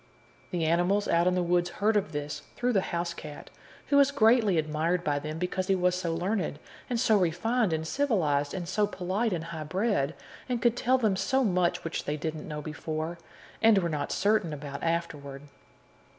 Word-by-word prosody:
The 170 Hz, -3 st, -1 dB
animals 175 Hz, +5 st, +2 dB
out 170 Hz, +1 st, +3 dB
in 180 Hz, -, +3 dB
the 180 Hz, -, +1 dB
woods 175 Hz, 0 st, +1 dB
heard 215 Hz, +2 st, +2 dB
of 195 Hz, -6 st, +1 dB
this 145 Hz, -1 st, -4 dB
through 245 Hz, 0 st, 0 dB
the 195 Hz, -, +3 dB
housecat, 170 Hz, -4 st, -5 dB, 0.4 s
who 280 Hz, -, +4 dB
was 280 Hz, -1 st, +6 dB
greatly 225 Hz, -7 st, +4 dB
admired 160 Hz, +3 st, 0 dB
by 145 Hz, -3 st, 0 dB
them 155 Hz, +2 st, -5 dB
because 180 Hz, +2 st, -2 dB
he 195 Hz, -, +3 dB
was 180 Hz, -1 st, +2 dB
so 180 Hz, -2 st, -2 dB
learned, 180 Hz, -3 st, -1 dB, 0.3 s
and 240 Hz, -2 st, 0 dB
so 225 Hz, -3 st, +4 dB
refined 190 Hz, +5 st, +1 dB
and 160 Hz, 0 st, -2 dB
civilized, 160 Hz, -, +1 dB
and 175 Hz, -2 st, -4 dB
so 205 Hz, +3 st, +1 dB
polite 200 Hz, +4 st, -1 dB
and 170 Hz, -3 st, -2 dB
high 165 Hz, -2 st, -6 dB
bred, 180 Hz, -3 st, 0 dB, 0.3 s
and 245 Hz, -1 st, 0 dB
could 235 Hz, 0 st, +2 dB
tell 255 Hz, +1 st, +2 dB
them 215 Hz, -6 st, +1 dB
so 230 Hz, +8 st, +1 dB
much 180 Hz, -4 st, +1 dB
which 165 Hz, -, -4 dB
they 150 Hz, +1 st, -2 dB
didn't 155 Hz, 0 st, -4 dB
know 150 Hz, -1 st, -5 dB
before, 155 Hz, +2 st, -4 dB, 0.4 s
and 225 Hz, -2 st, +6 dB
were 175 Hz, -3 st, +1 dB
not 150 Hz, -3 st, -2 dB
certain 200 Hz, -5 st, +1 dB
about 140 Hz, -1 st, -6 dB
afterward. 150 Hz, -5 st, -3 dB
175 Hz, 190 wpm, -28 LUFS, 155-210 Hz, 0.4 s, was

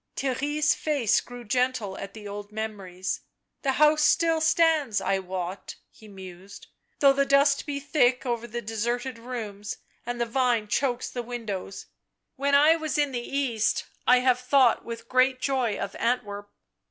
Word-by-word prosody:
Theirry' 275 Hz, +3 st, -2 dB
s 305 Hz, +1 st, +4 dB
face 285 Hz, -9 st, +1 dB
grew 245 Hz, 0 st, -10 dB
gentle 250 Hz, -3 st, -1 dB
at 195 Hz, +1 st, -8 dB
the 210 Hz, -2 st, -9 dB
old 205 Hz, 0 st, -7 dB
memories. 200 Hz, -4 st, -4 dB, 0.2 s
" -, -, -54 dB
The 270 Hz, -2 st, +1 dB
house 300 Hz, +2 st, +4 dB
still 325 Hz, +1 st, +3 dB
stands, 315 Hz, -7 st, +3 dB
I 195 Hz, 0 st, 0 dB
wot," 185 Hz, 0 st, -5 dB, 0.2 s
he 220 Hz, -, -16 dB
mused, 190 Hz, -1 st, -11 dB, 0.2 s
" -, -, -46 dB
though 275 Hz, -1 st, +7 dB
the 275 Hz, 0 st, +2 dB
dust 280 Hz, +1 st, +3 dB
be 285 Hz, -1 st, -2 dB
thick 265 Hz, -3 st, +2 dB
over 235 Hz, -1 st, -2 dB
the 240 Hz, +1 st, -5 dB
deserted 235 Hz, +3 st, -3 dB
rooms 220 Hz, -4 st, -6 dB, 0.3 s
and 240 Hz, 0 st, -4 dB
the 235 Hz, -, +1 dB
vine 235 Hz, -2 st, +1 dB
chokes 250 Hz, 0 st, 0 dB
the 245 Hz, -, -4 dB
wnidows 220 Hz, -6 st, -6 dB, 0.2 s
— -, -, -56 dB
when 280 Hz, +1 st, +1 dB
I 300 Hz, +3 st, +6 dB
was 310 Hz, -3 st, -3 dB
in 290 Hz, -2 st, +1 dB
the 245 Hz, -, -2 dB
East, 240 Hz, -4 st, -1 dB, 0.2 s
I 250 Hz, 0 st, +6 dB
have 250 Hz, -1 st, +3 dB
thought 250 Hz, -1 st, +3 dB
with 230 Hz, 0 st, -8 dB
great 255 Hz, +1 st, +3 dB
joy 255 Hz, -5 st, 0 dB
of 195 Hz, -, -5 dB
Antwerp." 205 Hz, -4 st, -2 dB
245 Hz, 175 wpm, -26 LUFS, 215-275 Hz, 0.3 s, though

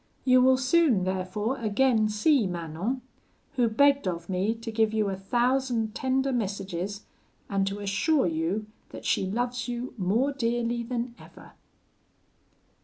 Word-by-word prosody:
You 255 Hz, -1 st, +6 dB
will 260 Hz, 0 st, +5 dB
soon, 260 Hz, -, +3 dB
therefore, 190 Hz, +6 st, -2 dB
again 220 Hz, 0 st, +2 dB
see 215 Hz, +2 st, +3 dB
Manon, 175 Hz, +9 st, -3 dB, 0.5 s
who 245 Hz, -4 st, +2 dB
begged 280 Hz, +1 st, +3 dB
of 170 Hz, -1 st, -4 dB
me 190 Hz, +4 st, 0 dB
to 230 Hz, 0 st, -7 dB
give 220 Hz, 0 st, +1 dB
you 215 Hz, -2 st, +1 dB
a 195 Hz, -, -2 dB
thousand 240 Hz, +2 st, 0 dB
tender 265 Hz, +2 st, 0 dB
messages, 200 Hz, -2 st, -3 dB, 0.4 s
and 195 Hz, -1 st, 0 dB
to 195 Hz, +1 st, -3 dB
assure 205 Hz, +10 st, +1 dB
you 170 Hz, +5 st, -1 dB, 0.2 s
that -, -, -10 dB
she 190 Hz, -, +1 dB
loves 245 Hz, +4 st, -2 dB
you 245 Hz, +1 st, -4 dB
more 225 Hz, +10 st, +1 dB
dearly 235 Hz, -2 st, -1 dB
than 235 Hz, 0 st, -3 dB
ever.'" -, -, -14 dB
225 Hz, 140 wpm, -27 LUFS, 195-255 Hz, 0.5 s, You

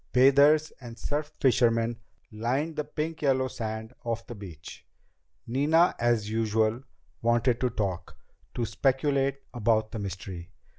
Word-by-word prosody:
Bathers 140 Hz, +4 st, +5 dB
and 120 Hz, -2 st, -9 dB
surf 150 Hz, +1 st, -3 dB
fishermen 115 Hz, -3 st, +2 dB, 0.3 s
lined 130 Hz, +9 st, -1 dB
the 150 Hz, -, -1 dB
pink 155 Hz, +2 st, -4 dB
yellow 130 Hz, -2 st, +2 dB
sand 110 Hz, -1 st, -5 dB
of 115 Hz, 0 st, -3 dB
the -, -, -8 dB
beach. 95 Hz, -8 st, -10 dB, 0.6 s
Nina, 150 Hz, +8 st, +3 dB
as 120 Hz, -3 st, +1 dB
usual, 110 Hz, +1 st, +1 dB, 0.4 s
wanted 120 Hz, +1 st, +2 dB
to 125 Hz, -, +2 dB
talk, 95 Hz, -6 st, -3 dB, 0.4 s
to 120 Hz, -, 0 dB
speculate 135 Hz, +4 st, +1 dB
about 110 Hz, -2 st, +1 dB
the 110 Hz, -, -5 dB
mystery. 95 Hz, -3 st, -6 dB
120 Hz, 130 wpm, -28 LUFS, 110-135 Hz, 0.6 s, Bathers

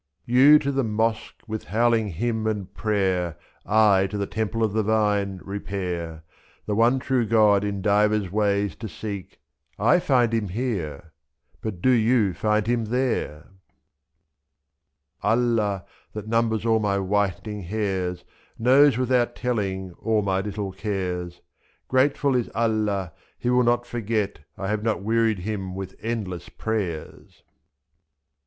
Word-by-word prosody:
You 135 Hz, +5 st, +7 dB
to 140 Hz, -2 st, -1 dB
the 135 Hz, -1 st, 0 dB
mosque, 110 Hz, 0 st, -2 dB
with 110 Hz, -1 st, -5 dB
howling 115 Hz, +1 st, +2 dB
hymn 110 Hz, +4 st, -1 dB
and 105 Hz, -4 st, -3 dB
prayer^ 95 Hz, -5 st, 0 dB, 0.3 s
I 105 Hz, -3 st, +4 dB
to 105 Hz, -, -5 dB
the 100 Hz, -, -1 dB
temple 110 Hz, +2 st, -2 dB
of 110 Hz, -2 st, 0 dB
the 110 Hz, -, +2 dB
vine, 105 Hz, -3 st, +1 dB
repair, 90 Hz, -5 st, -4 dB, 0.4 s
2/2 -, -, -40 dB
The 105 Hz, -, -1 dB
one 120 Hz, +4 st, +4 dB
true 130 Hz, -1 st, 0 dB
God 105 Hz, -2 st, +4 dB
in 100 Hz, -2 st, -3 dB
divers 105 Hz, -2 st, +2 dB
ways 100 Hz, -3 st, +1 dB
to 110 Hz, -, -6 dB
seek; 100 Hz, -2 st, -7 dB, 0.4 s
I 115 Hz, -, +4 dB
find 125 Hz, -9 st, +2 dB
him 110 Hz, -3 st, 0 dB
here 90 Hz, -, -4 dB, 0.2 s
— -, -, -38 dB
but 100 Hz, -5 st, -5 dB
do 130 Hz, -, +5 dB
you 115 Hz, -4 st, +3 dB
find 105 Hz, +1 st, +1 dB
him 120 Hz, -1 st, 0 dB
there? 115 Hz, -, -2 dB, 1.7 s
Allah, 110 Hz, -5 st, +1 dB, 0.3 s
that 105 Hz, 0 st, -6 dB
numbers 115 Hz, -1 st, +1 dB
all 110 Hz, -1 st, +3 dB
my 100 Hz, -2 st, 0 dB
whitening 100 Hz, +1 st, -1 dB
hairs. 95 Hz, -2 st, -2 dB, 0.3 s
Knows, 130 Hz, +2 st, +5 dB
without 125 Hz, -1 st, +1 dB
telling, 95 Hz, -7 st, -2 dB
all 110 Hz, -2 st, +1 dB
my 95 Hz, -1 st, 0 dB
little 100 Hz, -1 st, -4 dB
cares; 90 Hz, -3 st, -3 dB
2i3. -, -, -36 dB
Grateful 135 Hz, +1 st, +2 dB
is 120 Hz, -2 st, 0 dB
Allah, 105 Hz, -6 st, 0 dB, 0.2 s
he 125 Hz, -, -1 dB
will 125 Hz, 0 st, +4 dB
not 120 Hz, 0 st, +2 dB
forget 110 Hz, -6 st, -2 dB, 0.2 s
I 95 Hz, -, -4 dB
have 105 Hz, 0 st, -1 dB
not 110 Hz, -3 st, -1 dB
wearied 115 Hz, 0 st, +2 dB
Him 95 Hz, -2 st, -4 dB
with 95 Hz, -1 st, -6 dB
endless 105 Hz, -6 st, -4 dB
prayers. 100 Hz, -8 st, -5 dB
105 Hz, 145 wpm, -24 LUFS, 95-115 Hz, 1.7 s, You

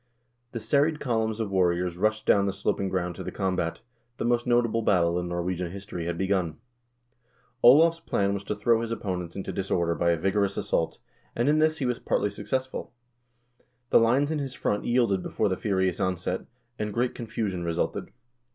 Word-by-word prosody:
The 115 Hz, -, -3 dB
serried 145 Hz, +6 st, +2 dB
columns 110 Hz, -3 st, -1 dB
of 110 Hz, -3 st, -2 dB
warriors 90 Hz, -2 st, +1 dB
rushed 110 Hz, +3 st, 0 dB
down 100 Hz, 0 st, +4 dB
the 100 Hz, -, -1 dB
sloping 100 Hz, 0 st, -1 dB
ground 90 Hz, -1 st, -1 dB
to -, -, -5 dB
the -, -, -5 dB
combat; 90 Hz, -4 st, -2 dB, 0.4 s
the -, -, -2 dB
most 120 Hz, 0 st, +1 dB
notable 120 Hz, -2 st, +2 dB
battle 90 Hz, -5 st, +2 dB
in 90 Hz, -, -3 dB
Nor 85 Hz, 0 st, -2 dB
wegian 90 Hz, -1 st, -2 dB
history 90 Hz, -2 st, -6 dB
had 85 Hz, -1 st, -2 dB
begun. 95 Hz, -4 st, 0 dB, 1.0 s
Olav's 160 Hz, +7 st, +7 dB
plan 100 Hz, -10 st, 0 dB
was 100 Hz, 0 st, -3 dB
to 105 Hz, -, -2 dB
throw 115 Hz, +2 st, +2 dB
his 115 Hz, -, -3 dB
opponents 90 Hz, -6 st, -4 dB
into 95 Hz, -, -4 dB
disorder 85 Hz, -3 st, 0 dB
by 85 Hz, +1 st, +1 dB
a 85 Hz, -, +3 dB
vigorous 100 Hz, +3 st, 0 dB
assault, 80 Hz, -, -1 dB, 0.4 s
and 120 Hz, +3 st, +1 dB
in 150 Hz, +1 st, +4 dB
this 155 Hz, 0 st, +3 dB
he 140 Hz, -, -2 dB
was 125 Hz, -1 st, -1 dB
partly 105 Hz, -, 0 dB
success 130 Hz, +5 st, -2 dB
ful. 130 Hz, -, -7 dB, 1.0 s
The -, -, +7 dB
lines 130 Hz, +6 st, +3 dB
in 155 Hz, -, -1 dB
his 135 Hz, -2 st, -4 dB
front 105 Hz, -, -1 dB
yielded 120 Hz, -6 st, +2 dB
before 105 Hz, -, -1 dB
the 95 Hz, -, 0 dB
furious 95 Hz, -3 st, 0 dB
onset, 90 Hz, 0 st, -2 dB, 0.3 s
and 105 Hz, 0 st, -2 dB
great 120 Hz, +4 st, 0 dB
confusion 110 Hz, -6 st, -3 dB
resulted. 85 Hz, 0 st, -2 dB
100 Hz, 190 wpm, -27 LUFS, 90-120 Hz, 1.0 s, Olav's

